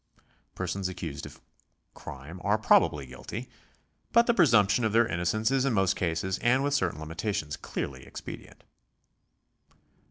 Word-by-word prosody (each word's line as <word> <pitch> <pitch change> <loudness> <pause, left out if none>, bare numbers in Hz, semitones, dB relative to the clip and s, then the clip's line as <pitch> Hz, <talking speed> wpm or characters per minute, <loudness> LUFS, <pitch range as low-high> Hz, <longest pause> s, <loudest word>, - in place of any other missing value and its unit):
Persons 95 +1 -2
ac 95 - -7
cused 80 -5 -5
of - - -14 0.5
crime 75 +7 -9
are 105 +2 +3
probably 75 -9 +3
guilty, 65 - -8 0.6
but 235 0 +5
the 235 - +3
presumption 115 - +4
of 110 -1 +1
tl 115 +1 +5
eir - - -6
innocence 90 +8 0
is 135 -1 +2
in 135 -3 +1
most 95 -2 +2
cases 90 +2 -1
and 130 +3 +3
with 145 0 0
certain 85 - 0
limitations 80 0 -3
clearly 65 -4 -5
expedient. - - -10
95 Hz, 150 wpm, -28 LUFS, 80-115 Hz, 0.6 s, but